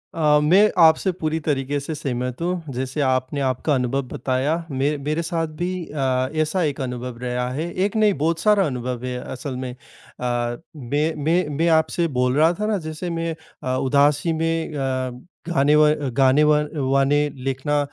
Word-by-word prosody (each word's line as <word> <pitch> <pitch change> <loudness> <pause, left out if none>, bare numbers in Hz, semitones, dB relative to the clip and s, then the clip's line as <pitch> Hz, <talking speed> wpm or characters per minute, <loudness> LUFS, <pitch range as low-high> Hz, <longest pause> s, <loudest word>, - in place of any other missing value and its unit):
अ, 150 -2 +4
मैं 195 +7 +5
आपसे 165 +3 +5
पूरी 160 -2 -2
तरीके 145 -1 0
से 140 +3 -5
सहमत 125 -1 -3
हूँ। 170 -5 -3
जैसे 130 +4 -3
आपने 130 +1 0
आपका 130 +3 0
अनुभव 130 +1 0
बताया 130 +6 -1 0.2
मे 140 +3 0
मेरे 150 +4 -2
साथ 165 -1 -2
भी 180 +1 0
अ, 130 -3 -1
ऐसा 155 +4 0
एक 145 -3 -2
अनुभव 125 -1 -5
रहा 125 0 -2
है। 160 +5 -3
एक 205 - -3
नहीं 215 -2 +4
बहुत 165 +1 +1
सारा 210 0 +4
अनुभव 125 -3 -4
है 125 -1 -3
असल 130 +1 -5
में। 125 - -4
अ, - - -14 1.0
मैं 150 +4 -1
मैं 170 +1 +2
मैं 165 - +2
आपसे 170 +1 -2
बोल 125 +1 +2
रहा 160 +3 +5
था 210 - 0
ना 215 -1 +1
जैसे 155 +3 -5
मैं 165 -1 -2 0.3
अ, 130 0 -1
उदासी 145 +5 +2
में 165 -1 -1
अ, 130 -2 -2 0.3
गाने 150 -3 +3
व 150 0 +6 0.3
गाने 135 +2 +5
व 150 0 +5 0.3
वाने 135 +1 +3 0.3
लिखना 135 +2 0
145 Hz, 175 wpm, -22 LUFS, 130-165 Hz, 1.0 s, व